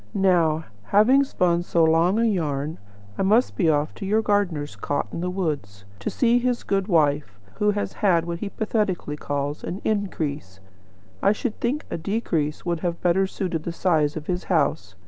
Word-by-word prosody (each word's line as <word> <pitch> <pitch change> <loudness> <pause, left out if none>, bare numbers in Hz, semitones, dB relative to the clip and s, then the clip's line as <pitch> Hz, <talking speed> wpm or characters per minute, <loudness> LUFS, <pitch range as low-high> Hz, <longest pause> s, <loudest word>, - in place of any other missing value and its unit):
"Now, 170 -5 +3 0.2
having 245 - +5
spun 175 -10 +1
so 170 -1 +1
long 165 +5 +3
a 230 - +3
yarn, 155 -7 -1 0.4
I - - +2
must 215 +6 +3
be 175 -6 +2
off 150 0 +1
to 200 - -7
your 215 +2 +2
gardener's 180 -9 0
cot 145 - -2
in 170 - -4
the 180 - -1
wood, 160 - -2 0.3
to 100 - -2
see 240 -1 +3
his 245 0 -1
good 195 -1 0
wife, 145 - +1 0.2
who 210 - +2
has 205 0 -1
had 175 -6 +2
what 170 0 -4
he 205 - -4
pathetically 210 -8 -1
calls 145 0 -3
'an 185 - -4
increase.' 155 - -2 0.6
I 200 - +4
should 225 +1 -4
think 265 +6 -1
a - - -3
decrease 165 -6 -2
would 170 -2 -1
have 170 0 -2
better 185 +2 +3
suited 180 -4 -3
the 170 - -4
size 160 -4 +1
of 155 - -6
his 180 +1 -3
house. 140 - 0
175 Hz, 185 wpm, -24 LUFS, 155-205 Hz, 0.6 s, having